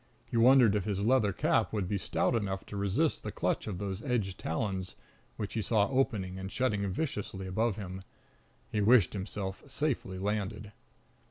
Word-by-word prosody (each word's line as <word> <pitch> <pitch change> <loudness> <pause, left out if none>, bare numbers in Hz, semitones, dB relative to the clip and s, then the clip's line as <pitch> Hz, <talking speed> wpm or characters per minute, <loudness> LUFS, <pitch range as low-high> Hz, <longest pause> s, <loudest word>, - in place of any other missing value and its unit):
He - - -6
wondered 120 -2 +6
if 100 -3 0
his 100 -2 -1
leather 110 -1 +3
cap - - +1
would 105 -4 -1
be 100 +1 -1
stout - - 0
enough 95 -4 -1
to - - -8
resist 100 -1 +1
the - - -5
clutch - - -1
of 100 -4 -3
those 100 +1 -4
edged 110 -8 -1
talons 95 +1 -2 0.4
which 105 -2 -4
he 110 - -1
saw 105 -1 +2
opening 105 -9 0
and 95 +1 -6
shutting 105 -6 0
viciously 100 -6 -3
above 110 +3 0
him. 95 -2 -6 0.7
He 105 - 0
wished 110 -1 +5
himself 95 -1 -4
safely 130 -10 -2
landed. 105 +1 -2
100 Hz, 170 wpm, -31 LUFS, 95-115 Hz, 0.7 s, wondered